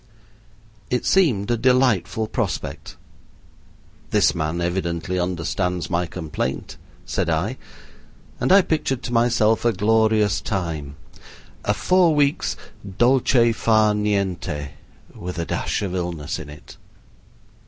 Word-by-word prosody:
It 125 Hz, -, -1 dB
seemed 120 Hz, -, +2 dB
a 120 Hz, -, +2 dB
delightful 115 Hz, -4 st, +2 dB
prospect. 110 Hz, -3 st, -4 dB, 1.1 s
"This -, -, +3 dB
man 80 Hz, +2 st, -2 dB
evidently 85 Hz, 0 st, -2 dB
understands 90 Hz, 0 st, -2 dB
my 85 Hz, 0 st, 0 dB
complaint," 75 Hz, -7 st, -4 dB, 0.3 s
said -, -, -1 dB
I, -, -, -1 dB, 0.8 s
and -, -, +1 dB
I 195 Hz, 0 st, +7 dB
pictured 145 Hz, -7 st, -1 dB
to 120 Hz, -, -4 dB
myself 115 Hz, -2 st, +3 dB
a 120 Hz, -, +3 dB
glorious 110 Hz, 0 st, +2 dB
time 80 Hz, -8 st, -3 dB, 0.7 s
a -, -, +1 dB
four 180 Hz, -4 st, +3 dB
weeks' 145 Hz, -1 st, +1 dB, 0.4 s
dolce 120 Hz, -1 st, +4 dB
far 110 Hz, -1 st, +3 dB
niente 100 Hz, -8 st, -1 dB, 0.4 s
with 90 Hz, 0 st, -7 dB
a 85 Hz, -, -2 dB
dash 105 Hz, -, -2 dB
of 95 Hz, -3 st, -3 dB
illness 85 Hz, -4 st, -3 dB
in 75 Hz, -, -9 dB
it. 75 Hz, -1 st, -13 dB
100 Hz, 115 wpm, -22 LUFS, 85-120 Hz, 1.1 s, I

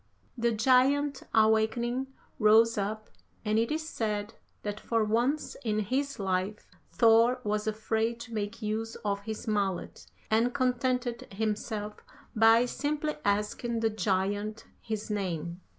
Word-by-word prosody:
The 235 Hz, -1 st, +1 dB
giant 265 Hz, +5 st, +3 dB
awakening, 225 Hz, +4 st, +2 dB, 0.3 s
rose 225 Hz, +1 st, +5 dB
up, 215 Hz, +1 st, -3 dB, 0.3 s
and 215 Hz, +1 st, +2 dB
it 230 Hz, +3 st, 0 dB
is 315 Hz, +1 st, -2 dB
said 210 Hz, -6 st, -2 dB, 0.3 s
that 210 Hz, 0 st, -4 dB
for 230 Hz, 0 st, 0 dB
once 240 Hz, +8 st, 0 dB
in 215 Hz, -3 st, 0 dB
his 265 Hz, +7 st, -1 dB
life 190 Hz, +1 st, -2 dB, 0.2 s
Thor 230 Hz, +2 st, +5 dB
was 210 Hz, +1 st, -1 dB
afraid 220 Hz, +2 st, -1 dB
to 235 Hz, -1 st, -9 dB
make 210 Hz, +1 st, -4 dB
use 220 Hz, +2 st, -2 dB
of 200 Hz, -1 st, 0 dB
his 220 Hz, +1 st, -5 dB
mallet, 200 Hz, -4 st, -2 dB, 0.2 s
and 230 Hz, +3 st, +2 dB
contented 250 Hz, -1 st, 0 dB
himself 210 Hz, 0 st, -3 dB, 0.4 s
by 225 Hz, +2 st, +6 dB
simply 300 Hz, +4 st, -2 dB
asking 210 Hz, +3 st, 0 dB
the 225 Hz, -1 st, +2 dB
giant 205 Hz, +2 st, -1 dB, 0.2 s
his 215 Hz, -1 st, -4 dB
name. 175 Hz, -4 st, -3 dB
220 Hz, 130 wpm, -29 LUFS, 210-240 Hz, 0.4 s, by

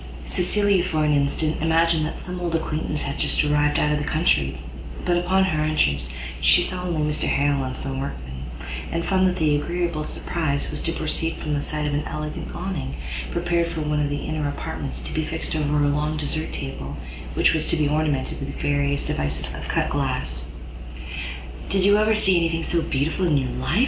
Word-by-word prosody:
Cecilia, 200 Hz, 0 st, +2 dB
for 155 Hz, -4 st, +1 dB
an 150 Hz, -, +3 dB
instant, 145 Hz, +2 st, +1 dB
imagined 165 Hz, -1 st, +3 dB
that -, -, -6 dB
some 180 Hz, 0 st, -4 dB
old 170 Hz, -2 st, -1 dB
acquaintance 155 Hz, -1 st, -1 dB
was 140 Hz, -, -2 dB
just -, -, +2 dB
arrived 150 Hz, 0 st, +3 dB
out 150 Hz, -, +3 dB
of 150 Hz, -, +2 dB
the -, -, -2 dB
country; 75 Hz, -, +2 dB, 0.5 s
but, 175 Hz, -, +3 dB
upon 185 Hz, +2 st, +3 dB
her 160 Hz, -5 st, +1 dB
entrance, 70 Hz, -, +2 dB, 0.3 s
she 70 Hz, +2 st, +6 dB
saw 185 Hz, -1 st, -2 dB
only 175 Hz, -4 st, -1 dB
Mr 150 Hz, -, 0 dB
Harrel 140 Hz, -1 st, +2 dB
and 130 Hz, 0 st, -4 dB
some 135 Hz, -1 st, -3 dB
workmen, 65 Hz, -, -5 dB, 0.5 s
and 170 Hz, 0 st, -1 dB
found 190 Hz, -1 st, +3 dB
that 180 Hz, -, +1 dB
the 155 Hz, -4 st, +3 dB
agreeable 170 Hz, 0 st, -1 dB
surprise 150 Hz, -2 st, -1 dB
was -, -, -3 dB
to 165 Hz, -, 0 dB
proceed 165 Hz, 0 st, -1 dB
from 150 Hz, -, -3 dB
the 145 Hz, -, 0 dB
sight 150 Hz, +1 st, -2 dB
of 145 Hz, -, 0 dB
an 145 Hz, +1 st, 0 dB
elegant 150 Hz, 0 st, -4 dB
Awning, 170 Hz, -7 st, -3 dB, 0.3 s
prepared 170 Hz, -, +1 dB
for 160 Hz, -, -3 dB
one 150 Hz, 0 st, 0 dB
of 145 Hz, -1 st, +1 dB
the 145 Hz, 0 st, -3 dB
inner 155 Hz, -2 st, -1 dB
apartments, 145 Hz, -1 st, -4 dB
to -, -, -6 dB
be 155 Hz, -, 0 dB
fixed 160 Hz, +1 st, -3 dB
over 150 Hz, -1 st, +1 dB
a -, -, +4 dB
long 150 Hz, +2 st, 0 dB
desert 155 Hz, +1 st, -2 dB
table, 70 Hz, -, -5 dB, 0.4 s
which -, -, +4 dB
was 160 Hz, -1 st, +1 dB
to -, -, +3 dB
be 150 Hz, -1 st, +3 dB
ornamented 150 Hz, -2 st, 0 dB
with 140 Hz, 0 st, -5 dB
various 140 Hz, 0 st, +1 dB
devices 70 Hz, 0 st, -2 dB
of -, -, -6 dB
cut -, -, 0 dB
glass. -, -, -2 dB, 1.2 s
"Did 195 Hz, -1 st, +2 dB
you 205 Hz, +1 st, +6 dB
ever 215 Hz, +1 st, +4 dB
see 190 Hz, -4 st, +4 dB
any 165 Hz, -1 st, +3 dB
thing 165 Hz, 0 st, -1 dB
so 170 Hz, 0 st, +1 dB
beautiful 160 Hz, +6 st, 0 dB
in 150 Hz, -3 st, +4 dB
your 130 Hz, -2 st, 0 dB
life?" 150 Hz, -, 0 dB
155 Hz, 205 wpm, -24 LUFS, 145-170 Hz, 1.2 s, she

